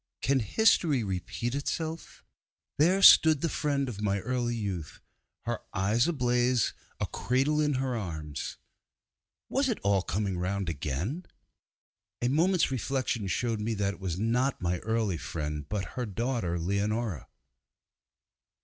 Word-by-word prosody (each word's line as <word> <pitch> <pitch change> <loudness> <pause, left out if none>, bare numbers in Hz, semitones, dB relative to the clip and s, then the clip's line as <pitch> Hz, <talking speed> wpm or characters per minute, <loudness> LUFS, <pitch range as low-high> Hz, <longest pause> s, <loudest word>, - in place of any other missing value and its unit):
can 135 +2 +2
history 145 - +3
repeat 95 +5 -3
itself? 160 +3 -4 0.6
there 185 +6 +4
stood 155 -5 +8
the - - +1
friend 145 -3 -1
of 105 -5 -6
my 100 -1 +1
early 120 0 -1
youth, 95 -8 -4 0.4
her - - -2 0.2
eyes 105 - +2
ablaze, 125 - +1 0.3
a - - 0
cradle 135 +5 +1
in 150 -2 +1
her 130 -1 -1
arms. 80 - -5 0.9
Was 270 0 +1
it 230 - 0
all 100 -1 +3
coming 95 0 -2
round 95 0 -1
again? 85 - -3 0.9
A 120 - +1
moment's 165 +3 +2
reflection 130 -4 -1
showed 110 +4 -1
me 110 +1 -1
that 100 -1 0
it - - -14
was 90 -3 -3
not 125 +5 +1
my 90 0 -1
early 110 -5 0
friend, 75 -2 -5
but 105 -2 -2
her 125 -2 -3
daughter, 115 -4 -1
Leonora. 100 - -1
115 Hz, 135 wpm, -29 LUFS, 95-135 Hz, 0.9 s, stood